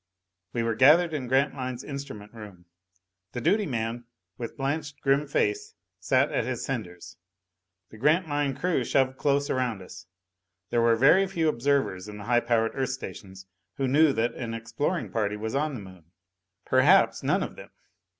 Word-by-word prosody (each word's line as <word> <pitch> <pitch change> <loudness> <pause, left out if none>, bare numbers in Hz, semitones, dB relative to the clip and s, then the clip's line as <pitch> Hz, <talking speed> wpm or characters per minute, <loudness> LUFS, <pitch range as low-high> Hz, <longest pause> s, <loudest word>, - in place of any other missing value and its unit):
We 115 - -1
were 115 0 0
gathered 155 +8 +5
in 135 -5 -3
Grantline's 130 -1 0
instrument 140 -8 -8
room. 105 -6 -12 0.7
The 125 - -3
duty 200 - +2
man, 120 -2 -3 0.3
with 120 - -7
blanched 145 +1 -3
grim 140 +2 +2
face, 415 - -1 0.2
sat - - +2
at - - 0
his - - -3
senders. 90 - -6 0.7
The 110 - -13
Grantline 145 - +1
crew 170 -4 0
shoved 130 +1 +1
close 140 0 +1
around 120 -7 -1
us. 85 - -12 0.6
There 120 - +2
were 115 0 +4
very 150 +11 +5
few 165 -4 0
observers 125 -8 0
in 105 0 -8
the 105 - -8
high 120 +3 +3
powered 115 -2 +1
Earth 135 -1 -2
stations 95 -7 -8 0.3
who 135 - -1
knew 150 +3 +5
that 115 0 0
an 115 -2 -5
exploring 115 +9 -3
party 105 -2 -1
was 110 +1 -4
on 145 +1 -1
the 115 - -7
Moon. 95 -4 -13 0.6
Perhaps 150 +10 +4
none - - +1
of - - -7
them. - - -12
130 Hz, 165 wpm, -27 LUFS, 115-145 Hz, 0.7 s, gathered